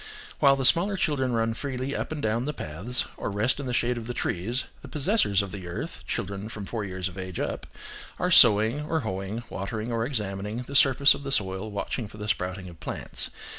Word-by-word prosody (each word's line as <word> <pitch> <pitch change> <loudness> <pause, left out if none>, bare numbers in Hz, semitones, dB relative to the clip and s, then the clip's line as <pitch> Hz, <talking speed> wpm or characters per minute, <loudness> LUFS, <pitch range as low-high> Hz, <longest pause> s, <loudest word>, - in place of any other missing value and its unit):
While 140 -1 +6
the 135 -1 -1
smaller 190 +8 +5
children 135 -7 +1
run 115 0 +1
freely 130 +2 -3
up - - -3
and 150 -2 -4
down 115 +3 +1
the 150 0 -3
paths, 95 +12 -2
or - - -3
rest 105 +7 +1
in 140 - -4
the - - -1
shade 120 0 +1
of 115 - -8
the 120 - -4
trees, 115 +9 -1 0.2
the - - -10
possessors 145 - +2
of 100 - -6
the 95 -4 -7
earth 85 - -5
(children 100 +2 -3
from 105 -3 -6
four 110 +1 -3
years 95 -1 -3
of 95 0 -8
age 95 -1 -5
up), - - -3 0.5
are 180 - 0
sowing, 115 - +7
or 160 0 0
hoeing, 100 +1 -4
watering 110 +4 -3
or 115 -1 0
examining, 105 -2 -3
the 140 - -9
surface 135 +1 +6
of - - -7
the 135 -1 -4
soil 95 -3 +1
watching 105 +2 -3
for 105 - -13
the 105 0 -5
sprouting 95 -2 -2
of 85 -2 -12
plants. - - -4
115 Hz, 215 wpm, -27 LUFS, 100-135 Hz, 0.5 s, sowing